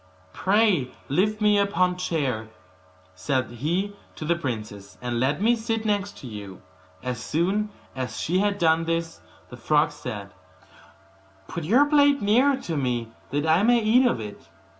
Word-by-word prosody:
'Pray 195 - +2 0.2
lift 210 +9 +1
me 210 -1 +4
upon 185 -3 +2
chair,' 135 -11 -2 0.6
said 130 -3 -1
he 175 - -2 0.2
to 155 - -6
the 170 +2 +2
princess, 110 -9 -6
'and 120 -1 -2
let 135 +5 +1
me 230 +4 +3
sit 225 -1 -2
next 205 -1 -1
to - - -11
you.' 105 -5 -8 0.4
As 125 -3 -4
soon 195 +7 0 0.3
as 125 -4 -4
she 180 +4 +1
had 200 0 +1
done 165 -2 +3
this, 165 0 -2 0.3
the - - -10
frog - - +2
said, - - -7 1.1
'Put 165 - -5
your 245 - +5
plate 285 -1 +4
nearer 250 +7 +3
to 165 - -4
me, 120 -5 -1 0.2
that 145 +2 -1
I 160 +3 +4
may 240 +3 +4
eat 230 +4 +4
out - - +4
of - - -6
it. 100 -5 -9
170 Hz, 160 wpm, -25 LUFS, 130-210 Hz, 1.1 s, your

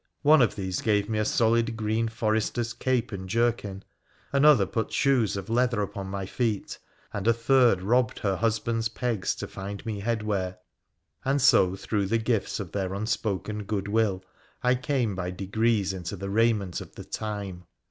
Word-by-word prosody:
One 155 0 +7
of 120 - +2
these 95 -3 -3
gave 105 -2 +1
me 110 -1 -1
a 105 - +1
solid 115 +1 +2
green 110 +1 0
forester's 110 +1 -1
cape 125 -3 0
and 95 -2 -6
jerkin; 110 -3 0 0.5
another 140 -6 +6
put 110 +4 -3
shoes 125 -7 +2
of 95 - -5
leather 120 0 +1
upon 100 -1 -3
my 95 0 -4
feet; 110 0 -2 0.3
and 100 +1 -3
a 115 - +6
third 120 -4 +3
robbed 125 +4 +2
her 100 -3 -1
husband's 115 +1 0
pegs 115 -4 -1
to - - -6
find 100 +1 -7
me 105 -3 -3
headwear, 105 -4 -1 0.7
and 135 +2 +1
so 95 -8 +5
through 100 0 -1
the 115 - +2
gifts 110 -1 -1
of 95 -6 -6
their 95 0 -2
unspoken 105 -1 -2
good 100 -1 -2
will 100 -3 +1 0.4
I 125 0 +4
came 130 -5 0
by 90 -1 -3
degrees 100 +2 0
into 90 0 -5
the 100 +1 -5
raiment 105 -4 +1
of - - -12
the - - -9
time. 100 -4 -5
110 Hz, 170 wpm, -27 LUFS, 100-115 Hz, 0.7 s, One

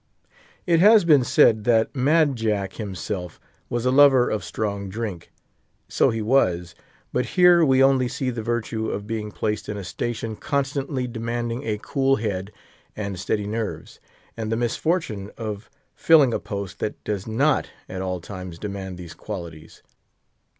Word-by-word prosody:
It 170 -2 +3
has 210 +1 +7
been 150 -6 +5
said 110 -2 +4
that 115 +2 +2
Mad 145 +2 +3
Jack 105 -4 -1
himself 95 -4 -5 0.3
was 120 0 -2
a 125 - +3
lover 135 -2 +6
of 110 - -2
strong 100 -2 -3
drink. 105 -4 -5 0.6
So - - +2
he 110 -1 -2
was. 90 -8 +1 0.4
But 125 - 0
here 180 -1 +7
we 135 -3 +4
only 135 -2 +4
see 130 +1 -2
the 115 -2 -4
virtue 110 -1 -2
of 100 - -4
being 110 -1 -4
placed 105 0 -3
in 105 - -3
a 100 - -5
station 110 +4 -4
constantly 140 0 -2
demanding 120 0 -3
a 110 -2 -1
cool 135 +5 +1
head 100 -4 -3 0.4
and 100 -3 -4
steady 105 +2 -1
nerves, 110 +1 -5 0.4
and 110 -1 -4
the 115 - +1
misfortune 120 - -1
of 110 -2 -6 0.2
filling 150 -7 +5
a - - 0
post 100 -2 -6
that - - -4
does 100 -1 -3
not 135 +6 +1 0.2
at 95 0 -5
all 90 -1 -2
times 90 -2 -8
demand 95 -1 -6
these 85 -2 -9
qualities. 85 -6 -9
110 Hz, 155 wpm, -23 LUFS, 100-130 Hz, 0.6 s, has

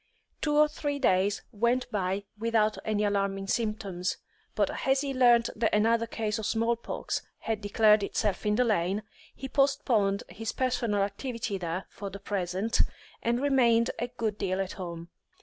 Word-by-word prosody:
Two 295 -1 +1
or 300 0 +7
three 290 -1 -3
days 195 -4 +2
went 240 +3 +1
by 195 -1 -1
without 215 -1 +1
any 210 -1 0
alarming 200 -1 0
symptoms, 200 -4 -2 0.4
but - - -1
as 270 0 +4
he 280 -1 -2
learnt 240 -2 +5
that 225 +1 +1
another 230 +2 +3
case 220 -1 -2
of 215 - -2
small 230 +1 +1
pox 235 - -4 0.2
had 220 -2 -2
declared 210 +1 +4
itself 200 0 -1
in 210 0 +2
the 250 - +4
Lane, 205 -2 +1 0.3
he 265 - -6
postponed 240 -8 +2
his 225 +1 -5
personal 235 -5 +1
activity 215 0 -3
there 175 +2 -3
for 200 -1 -7
the 195 - -8
present, 190 +2 -1 0.4
and 240 +3 0
remained 240 -4 +4
a 240 - -1
good 230 -4 -3
deal 185 0 -1
at 195 -1 -2
home. 170 -2 -7
215 Hz, 165 wpm, -29 LUFS, 200-235 Hz, 0.4 s, or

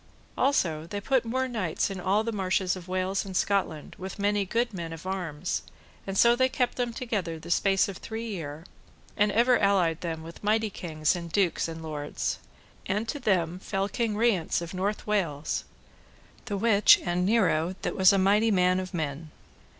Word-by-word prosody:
Also 170 - +1
they 205 +4 -4
put 255 +3 +1
more 260 +3 -1
knights 205 -7 -1
in 190 - -5
all 195 +4 +1
the 230 - -2
marches 190 -2 0
of 180 -1 -10
Wales 185 +1 -1
and 190 -2 -4
Scotland, 190 -7 -1
with 190 +1 -6
many 205 0 +1
good 235 +4 0
men 170 -3 -5
of 165 +2 -10
arms, 180 -4 -3 0.5
and 195 0 -3
so 235 +3 +6
they 260 +1 +3
kept 250 -1 0
them 245 -1 -1
together 210 -9 -3
the 160 - -8
space 195 +2 +3
of 195 -2 -6
three 225 +1 -6
year, 160 -6 -6 0.5
and 210 0 +3
ever 240 +4 +4
allied 185 -5 +2
them 165 -2 -4
with 165 +4 -11
mighty 215 +1 +1
kings 155 -3 -1
and 170 -1 -6
dukes 185 -3 +1
and 165 0 -7
lords. 150 -2 -3 0.5
And 210 +4 -1
to 290 - -3
them 180 -7 0
fell 195 0 -2
King 215 0 -1
Rience 215 -8 +2
of 170 0 -7
North 195 +3 -2
Wales, 165 -9 -1 0.8
the 200 - -3
which 210 -1 +6
and 175 0 0
Nero 185 -4 +2
that - - -2
was 190 -1 +6
a 200 - +3
mighty 205 +4 +3
man 185 -2 +3
of 185 0 -5
men. 155 0 -3
190 Hz, 185 wpm, -27 LUFS, 170-210 Hz, 0.8 s, so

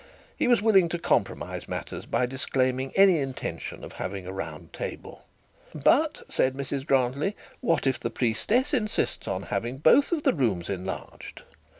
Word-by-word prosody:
He - - 0
was 240 -4 +4
willing 195 -6 +5
to 175 - -2
compromise 170 - -1
matters - - -5
by 125 - +1
disclaiming 130 0 -1
any 195 -4 +6
intention 135 -2 -5
of - - -9
having 95 -1 -5
a 95 - -6
round 80 -5 -7
table. - - -7 0.5
'But,' 295 - +3
said 130 0 +1
Mrs 140 +1 -4
Grantly, 135 +8 +1 0.2
'what 165 - +1
if 130 -3 +1
the 115 - -2
priestess 205 - +1
insists 220 -6 0
on - - -2
have 130 +5 -3
both 280 - +6
the - - +4
rooms 100 - 0
enlarged?' 95 0 -6
135 Hz, 155 wpm, -27 LUFS, 120-190 Hz, 0.5 s, any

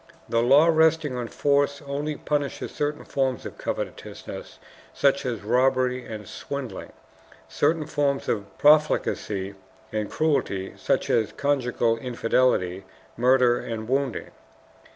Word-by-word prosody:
The 115 - +1
law 135 +6 +6
resting 160 -3 +3
on 120 -1 -3
force 140 +2 +1
only 145 +2 -3
punishes 145 -1 -2
certain 150 +1 -3
forms 130 -3 -1
of - - -8
covetousness, - - -6 0.4
such 140 -1 +2
as 115 -6 -3
robbery 125 +2 +1
and 105 -3 -7
swindling, 140 +2 -6 0.6
certain 160 -1 +1
forms 140 -2 0
of 100 -3 -3
profligacy 145 -10 +2 0.4
and 105 -1 -2
cruelty, 120 -11 0
such - - 0
as 110 -2 +2
conjugal 125 -5 0
infidelity, 115 -6 +1 0.3
murder, 125 0 +4
and 110 -1 -5
wounding. 135 -1 -1
130 Hz, 115 wpm, -25 LUFS, 115-145 Hz, 0.6 s, law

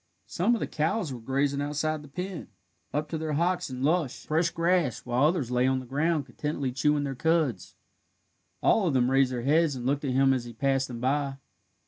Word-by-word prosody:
Some 210 +8 +1
of - - -3
the - - -1
cows 160 0 -1
were 125 - -7
grazing 140 +4 0
outside 150 +1 -1
the 150 - -12
pen, 180 +4 -6 0.4
up 150 +1 -1
to 160 - -3
their 155 -1 -2
hocks 175 +3 0
in 130 0 -5
lush, 155 -3 0
fresh 165 +2 +1
grass, 170 -7 0
while 125 +3 +2
others 155 -7 -1
lay 125 +1 +2
on 130 0 +2
the 130 - -8
ground 150 +3 0
contentedly 140 +1 -3
chewing 145 +3 +1
their 140 -1 -2
cuds. 150 - 0 0.9
All 200 -5 +4
of 150 - 0
them 125 0 +3
raised 135 -1 +3
their 120 -2 -3
heads 155 +2 +3
and 125 -1 -6
looked 140 +2 0
at 140 - -1
him 135 +1 +4
as 125 -2 -2
he 120 - -9
passed 135 +2 0
them 120 -2 -7
by. 140 +1 0
140 Hz, 210 wpm, -27 LUFS, 130-160 Hz, 0.9 s, All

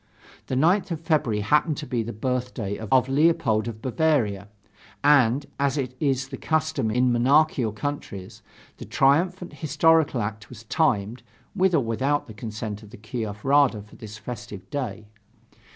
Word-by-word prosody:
The 130 - -2
9th 180 +8 +3
of 165 -2 -4
February 145 -11 +1
happened 150 +7 +2
to 150 - -5
be 125 -5 -1
the 115 +1 -4
birthday 125 -3 -3
of 125 +4 +2
Leopold 135 -6 +2
of 110 -1 -7
Bavaria, 125 -8 +1 0.6
and, 140 -2 +4
as 140 0 +1
is 130 0 -1
the 135 - -6
custom 155 -6 0
in 125 +3 +2
monarchical 130 0 +3
countries, 110 -6 -6 0.4
the - - -8
triumphant 175 +6 +1
historical 155 -3 +2
act 105 +1 -6
was 115 -3 -11
timed 115 -4 0 0.3
with 185 -1 +3
or 140 - +3
without 130 +6 0
the 110 - -11
consent 110 -1 -6
of 105 - -14
the - - -12
Kiev 105 0 -6
Rada 135 -6 +3
for 105 - -17
this 110 -1 -10
festive 110 -3 -8
day. 115 -7 -4
125 Hz, 150 wpm, -25 LUFS, 110-150 Hz, 0.6 s, and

